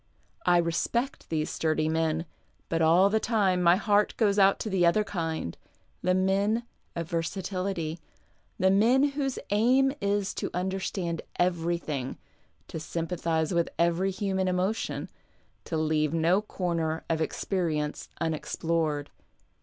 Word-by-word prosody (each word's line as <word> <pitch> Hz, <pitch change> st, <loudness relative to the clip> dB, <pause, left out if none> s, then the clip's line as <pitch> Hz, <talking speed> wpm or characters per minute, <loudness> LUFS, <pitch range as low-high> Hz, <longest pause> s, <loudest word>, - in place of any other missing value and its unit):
I 175 Hz, -, +6 dB
respect 175 Hz, +10 st, -1 dB
these 155 Hz, -1 st, -1 dB
sturdy 155 Hz, -1 st, 0 dB
men, 160 Hz, 0 st, 0 dB, 0.4 s
but 165 Hz, 0 st, 0 dB
all 175 Hz, +5 st, +5 dB
the 220 Hz, -, +3 dB
time 200 Hz, -6 st, +1 dB
my 175 Hz, 0 st, +6 dB
heart 205 Hz, +1 st, +2 dB
goes 205 Hz, -3 st, +3 dB
out 195 Hz, 0 st, +5 dB
to -, -, -3 dB
the 190 Hz, -2 st, +2 dB
other 175 Hz, +5 st, +4 dB
kind, 165 Hz, -, -3 dB, 0.5 s
the 185 Hz, 0 st, +2 dB
men 200 Hz, +5 st, +2 dB, 0.3 s
of 170 Hz, -1 st, -3 dB
versatility, 175 Hz, 0 st, -2 dB, 0.6 s
the 190 Hz, +1 st, +3 dB
men 245 Hz, +8 st, +4 dB
whose 275 Hz, -2 st, -2 dB
aim 255 Hz, +6 st, +4 dB
is 200 Hz, 0 st, 0 dB
to -, -, -2 dB
under 190 Hz, +2 st, -1 dB
stand 170 Hz, -3 st, -3 dB
everything, 170 Hz, -6 st, -1 dB, 0.5 s
to 160 Hz, -, -6 dB
sympathize 165 Hz, 0 st, -1 dB
with 170 Hz, -1 st, +1 dB
every 170 Hz, +3 st, +2 dB
human 190 Hz, -1 st, -1 dB
emotion, 185 Hz, +4 st, -1 dB, 0.6 s
to 165 Hz, -, -3 dB
k'a\e 155 Hz, -1 st, +2 dB
no 165 Hz, +5 st, +2 dB
corner 170 Hz, -5 st, -2 dB
of 160 Hz, -1 st, 0 dB
experience 160 Hz, -3 st, -2 dB
unexplored. 160 Hz, -1 st, -1 dB
175 Hz, 130 wpm, -28 LUFS, 165-200 Hz, 0.6 s, I